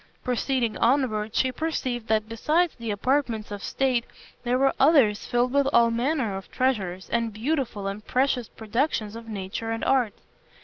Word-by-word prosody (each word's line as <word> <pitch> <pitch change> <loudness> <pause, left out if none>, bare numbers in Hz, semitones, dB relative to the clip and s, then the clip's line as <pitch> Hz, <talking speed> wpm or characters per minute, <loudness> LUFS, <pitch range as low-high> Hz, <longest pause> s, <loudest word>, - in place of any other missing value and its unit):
Proceeding 250 -2 0
onward, 230 -4 +1
she 260 - +2
perceived 255 -5 -3
that 215 0 +1
besides 305 +10 +1
the 230 -2 -7
apartments 225 0 0
of 205 -1 -6
state 255 -3 +1 0.4
there 250 +1 +1
were 270 +1 +3
others 265 -8 +4
filled 245 +1 +1
with 280 -1 +3
all 235 -2 +5
manner 240 -3 0
of 195 - -8
treasures, 195 -8 -1
and 230 -1 0
beautiful 230 -2 -2
and 200 +2 -4
precious 255 -2 0
productions 220 -1 -2
of 230 0 -9
nature 200 +2 -4
and 225 0 -2
art. 250 -6 +2
235 Hz, 160 wpm, -25 LUFS, 215-265 Hz, 0.4 s, all